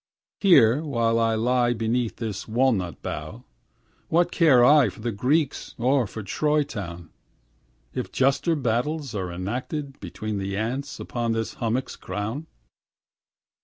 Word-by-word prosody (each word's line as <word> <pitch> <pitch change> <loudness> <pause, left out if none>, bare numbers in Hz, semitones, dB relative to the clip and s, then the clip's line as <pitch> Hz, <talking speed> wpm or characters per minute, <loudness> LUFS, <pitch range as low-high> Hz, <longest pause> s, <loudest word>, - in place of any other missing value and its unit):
Here 140 - +6
while 115 -6 +1
I 115 -1 +2
lie 120 +2 +2
beneath 115 +1 -1
this 110 -4 -5
walnut 110 - 0
bough, - - -6 0.7
What 175 +2 +3
care 135 -8 +5
I 145 0 +6
for - - -13
the 120 +2 -2
Greeks 135 +8 0
or 130 0 +2
for 110 +2 -7
Troy 150 +9 +1
town, 85 - -7 0.8
If - - -4
juster 135 +5 +2
battles 140 +2 -1
are 95 -4 -3
enacted 120 - -3
now 135 -1 -16
Between 100 +3 -5
the 100 0 -3
ants 130 +6 -3
upon 120 -2 -2
this 115 0 -2
hummock's 120 +2 -2
crown? 110 +10 -5
120 Hz, 135 wpm, -25 LUFS, 110-140 Hz, 0.8 s, Here